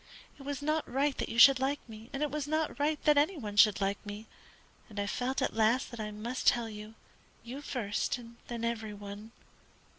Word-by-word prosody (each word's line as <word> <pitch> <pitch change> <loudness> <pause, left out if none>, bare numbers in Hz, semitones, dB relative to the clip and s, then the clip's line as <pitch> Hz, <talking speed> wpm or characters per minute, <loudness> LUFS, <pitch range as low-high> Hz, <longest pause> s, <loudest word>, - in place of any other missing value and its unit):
It - - -11
was 280 0 -4
not 310 +1 -1
right 275 +2 +1
that - - -2
you 230 - -5
should 265 +2 +9
like 275 +2 0
me 220 +1 -11
it 290 +1 -1
was 295 -1 -3
not 310 -1 -1
right 295 +1 +1
that 295 -1 +5
any 320 +5 +1
one 210 -7 -6
should 210 -1 +6
like 200 0 -1
me 205 +1 -7 0.6
and 210 -2 -6
I 200 - 0
felt 255 +5 -1
at - - 0
last 230 +5 +2
that 235 - -8
I 215 -1 -3
must 225 +5 -4
tell 235 -1 +4
you; 215 0 -9 0.5
you 250 +5 -7
first, 240 -6 -2
and 235 -1 -12
then 235 -1 -5
every 220 -2 -2
one. 205 +2 -9
235 Hz, 210 wpm, -31 LUFS, 215-280 Hz, 0.6 s, should